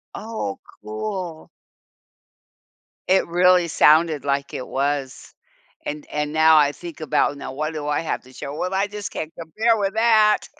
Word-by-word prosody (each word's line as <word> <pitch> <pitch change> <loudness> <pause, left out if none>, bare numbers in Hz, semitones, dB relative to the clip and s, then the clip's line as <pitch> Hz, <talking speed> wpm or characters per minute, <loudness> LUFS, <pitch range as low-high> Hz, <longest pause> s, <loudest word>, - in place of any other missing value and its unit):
Oh, 215 - -5 0.2
cool! 165 - -5 1.6
It 190 +1 +3
really 180 0 +4
sounded 155 -1 +4
like 140 0 -1
it 130 - -5
was, 140 -1 -3 0.5
and 150 0 -5
and 150 0 -2
now 160 0 +6
I 145 -1 +4
think 170 0 -10
about, 145 -1 +1
"Now 135 - -7
what 155 +3 -2
do 150 -1 -5
I 150 +2 0
have 165 - -3
to 130 +1 -17
show?" 140 +2 -7
Well, 185 +4 -3
I 195 +2 +1
just 205 0 -6
can't 160 +1 -5
compare 220 +8 +1
with 200 -1 -1
that! 220 -2 +4
160 Hz, 160 wpm, -22 LUFS, 145-190 Hz, 1.6 s, now